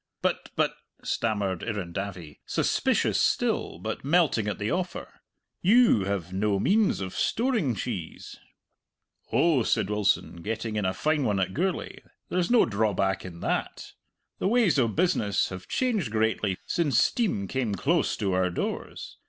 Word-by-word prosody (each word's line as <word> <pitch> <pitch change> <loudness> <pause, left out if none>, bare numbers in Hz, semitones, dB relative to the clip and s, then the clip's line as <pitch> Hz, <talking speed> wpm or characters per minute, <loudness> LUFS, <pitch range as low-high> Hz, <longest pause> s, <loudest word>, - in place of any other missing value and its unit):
"But - - -1
but," - - +1 0.3
stammered 100 -5 -1
Irrendavie, 95 -6 -5
suspicious - - +1
still, - - 0
but - - -5
melting 145 - +2
at 105 - -2
the 105 +1 -2
offer, 180 0 -4 0.4
"you 205 - +5
have 95 -3 -3
no 100 +1 +1
means 205 - +2
of 95 -1 -4
storing 225 - 0
cheese." 100 -8 -6 0.9
"Oh," 160 -6 +3
said 105 -2 0
Wilson, 105 -3 +1
getting 110 +4 -4
in 105 -2 -1
a 95 - +1
fine 155 -1 +1
one 105 -5 +1
at 95 -1 -1
Gourlay, 185 +3 -2 0.3
"there's 180 -1 0
no 240 -1 +5
drawback 100 -3 0
in 85 -2 -9
that! - - -3 0.5
The - - 0
ways 215 - +3
o' 120 - +3
business 115 - +1
have 95 -1 -8
changed 220 - 0
greatly 110 -3 0
since 150 -8 +1
steam 130 - +1
came 120 -5 -1
close - - +1
to 95 -2 -1
our 90 0 +2
doors. 90 - -5
110 Hz, 145 wpm, -27 LUFS, -, 0.9 s, you